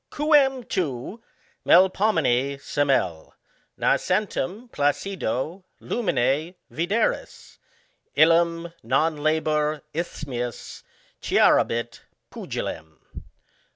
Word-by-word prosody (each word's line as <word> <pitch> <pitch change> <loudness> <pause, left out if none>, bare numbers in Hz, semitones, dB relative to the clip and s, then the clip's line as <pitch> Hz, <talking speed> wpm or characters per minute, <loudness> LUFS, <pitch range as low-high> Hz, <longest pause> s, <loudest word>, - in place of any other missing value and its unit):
Qucm 280 -5 +2
tu, 170 - -3 0.4
Melpomene, 160 - +3
semel, 135 - -1 0.4
Nascentem 205 +3 0
placido 155 - -2 0.2
luminc 155 - -1 0.2
vidcris, 175 - -2 0.6
I - - +4
Ham 165 +1 +3
non 150 +7 +1
labor 155 0 0
isthmius 130 -7 -5 0.4
Clarabit 115 0 +2 0.3
Puqilem. 80 -1 -6
155 Hz, 65 wpm, -24 LUFS, 135-185 Hz, 0.6 s, I